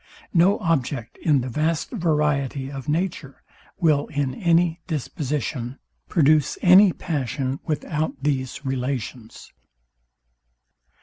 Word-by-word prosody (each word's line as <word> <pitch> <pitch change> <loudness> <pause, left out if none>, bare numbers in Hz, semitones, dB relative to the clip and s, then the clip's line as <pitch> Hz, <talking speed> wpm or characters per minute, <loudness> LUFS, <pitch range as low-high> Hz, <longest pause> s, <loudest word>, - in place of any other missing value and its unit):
No 185 +3 +4
object, 135 -8 -1
in 145 -4 +3
the 125 - -4
vast 155 +5 -1
variety 150 - 0
of 135 +1 -6
nature, 160 -4 -3 0.4
will, 155 -5 +2
in 145 -3 -2
any 170 +2 +2
disposition, 140 -4 -3 0.3
produce 155 -2 +3
any 185 +2 +8
passion 135 -4 -3
without 155 0 -2
these 135 -1 -2
relations. 125 -3 -4
150 Hz, 100 wpm, -23 LUFS, 135-165 Hz, 0.4 s, any